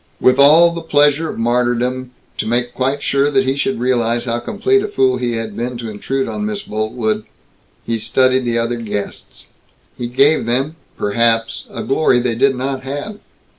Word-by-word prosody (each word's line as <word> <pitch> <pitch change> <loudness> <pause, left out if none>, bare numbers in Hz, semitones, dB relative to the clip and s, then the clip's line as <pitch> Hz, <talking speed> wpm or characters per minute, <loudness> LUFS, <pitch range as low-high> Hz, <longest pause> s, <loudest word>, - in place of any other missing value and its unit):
With 130 +1 +3
all 160 +5 +7
the 170 0 -5
pleasure 150 0 +2
of - - -6
martyrdom 120 +2 0 0.3
to - - -1
make 120 +1 -1
quite 135 +2 -1
sure 140 +1 +2
that 135 -2 +2
he 135 +1 0
should 140 -1 -1
realize 120 -1 0
how 120 -1 -1
complete 395 - +1
a 415 - -2
fool 130 - +1
he 120 -1 -2
had 115 -2 -4
been 120 +1 -3
to 115 -2 -6
intrude 130 +6 -2
on 210 - -4
Miss 210 -1 -3
Boltwood 110 0 -2 0.6
he 115 -1 -1
studied 130 +4 +2
the 120 -1 0
other 115 +1 -1
guests. 105 -3 -6 0.5
He 120 - -4
gave 135 +2 +2
them, 135 +6 -1 0.2
perhaps, 115 +2 0
a - - -6
glory 135 -2 +2
they 120 -1 0
did 135 +4 +2
not 135 +1 -3
have. 145 +11 -6
125 Hz, 180 wpm, -17 LUFS, 115-140 Hz, 0.6 s, all